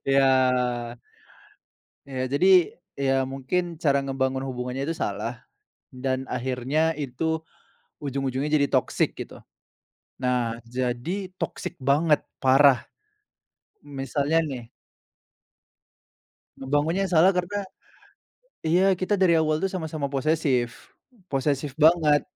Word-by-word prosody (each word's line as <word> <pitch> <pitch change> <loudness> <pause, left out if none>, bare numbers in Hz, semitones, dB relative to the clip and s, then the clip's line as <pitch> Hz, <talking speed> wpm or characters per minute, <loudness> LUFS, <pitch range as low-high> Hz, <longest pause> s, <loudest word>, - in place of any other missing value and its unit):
Iya. 135 0 +5 1.9
Iya, 130 -2 -4
jadi. 180 +7 +3 0.5
Iya, 135 -1 +2
mungkin 155 +6 -3
cara 140 -3 +2
ngebangun 135 -1 -1
hubungannya 125 0 -4
itu 160 - -2
salah, 105 +3 -3 0.6
dan 130 0 -3
akhirnya 130 +5 0
itu 160 +4 -2 0.6
ujung-ujungnya 135 +1 -2
jadi 140 - +3
toxic - - 0
gitu. - - -8 0.8
Nah, 120 -2 0
jadi, 130 +11 -3
toxic - - -5
banget, 145 +3 +3 0.2
parah. 135 0 +5 1.0
M 145 -1 -12
misalnya 145 +4 0
nih 125 -6 -6 1.9
Ngebangunnya 145 +8 0
yang 185 - -4
salah 170 +4 +6
karena 180 +3 -1 1.0
iya, 185 +4 +3
kita 185 +3 0
dari 185 -3 +4
awal 155 -1 +1
tuh 195 - 0
sama-sama 155 -6 -4
posesif, 135 -4 -1 0.4
posesif 140 0 -1
banget. 155 -2 +5
140 Hz, 100 wpm, -25 LUFS, 130-160 Hz, 1.9 s, salah